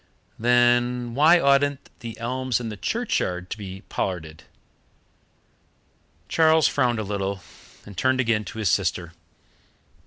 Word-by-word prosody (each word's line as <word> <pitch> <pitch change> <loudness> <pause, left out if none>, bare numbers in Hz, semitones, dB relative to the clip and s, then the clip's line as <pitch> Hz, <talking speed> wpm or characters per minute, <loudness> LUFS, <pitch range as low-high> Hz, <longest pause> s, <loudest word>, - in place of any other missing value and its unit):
"Then 120 0 +2
why 155 +7 +5
oughtn't 140 -1 +2
the 115 -2 -8
elms 125 +1 -2
in 115 -2 -5
the 105 - -6
churchyard 90 - -2
to - - -4
be 95 -1 -8
pollarded?" 80 -4 -4 1.8
Charles 160 -1 +4
frowned 125 -4 +1
a 110 - -2
little, 100 -1 -3 0.4
and 100 - -11
turned 130 +7 +1
again 115 -4 +1
to - - -9
his 110 -4 0
sister. 85 -2 -1
120 Hz, 125 wpm, -24 LUFS, 100-130 Hz, 1.8 s, why